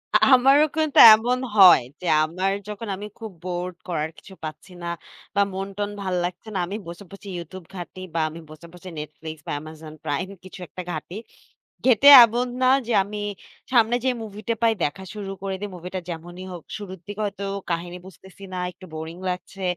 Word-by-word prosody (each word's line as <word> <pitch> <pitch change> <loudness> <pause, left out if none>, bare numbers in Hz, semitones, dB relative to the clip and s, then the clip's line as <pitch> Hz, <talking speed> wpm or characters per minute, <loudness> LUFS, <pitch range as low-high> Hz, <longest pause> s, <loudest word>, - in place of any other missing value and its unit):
আ - - +10 0.2
আমারও 275 +4 +5
কিন্তু 310 -2 0 0.2
এমন 245 +3 +2 0.2
হয় 185 -9 +9 0.2
যে 180 - -4 0.2
আমার 185 +5 -1 0.2
যখন 210 +2 -6
আমি 205 - -7
খুব 220 -2 -7
বোরড 180 0 -4
করার 160 -3 -2
কিছু 195 - -14
পাচ্ছি 155 +4 -8
না - - -4 0.5
বা 200 - +4
মন 195 +1 -3
টন 205 0 -1
ভাল 185 -2 -2
লাগছে 180 +4 -5
না। - - 0
আমি 195 +4 -5
বসে 170 +4 -8
বসে 200 +1 -12
YouTube 175 +1 -9
ঘাঁটি 180 +1 -8 0.2
বা 165 - +1
আমি 160 - -10
বসে, 155 +2 -12
বসে 180 +1 -10
Netflix 155 +1 -8
বা - - -3
Amazon 155 0 -10
Prime 180 +7 -2
কিছু 185 0 -11
একটা 185 - -8
ঘাঁটি। 160 +3 -6 0.7
ঘেঁটে 260 +2 +7 0.2
এমন 240 +3 -1
না 255 - +4 0.2
যে 240 - 0
আমি 210 +1 -7 0.5
সামনে 235 0 +4
যে - - +4
মুভিটা 215 +2 -4
পাই 225 -1 +5
দেখা 190 +6 -2
শুরু 200 -2 -5
করে 195 -1 -2
দেই। 205 - -4
মুভিটা 180 +2 -6
যেমনই 175 +2 -7
হোক 170 - -9
শুরুর 190 -3 -8
দিকে 205 +1 -5
হয়তো 200 0 -5 0.3
কাহিনী 175 +1 -3
বুঝতেছি 190 +2 -15
না, - - -3
একটু 185 - -14
বোরিং 160 +2 -6
লাগছে 185 +1 -6
185 Hz, 190 wpm, -24 LUFS, 170-210 Hz, 0.7 s, আ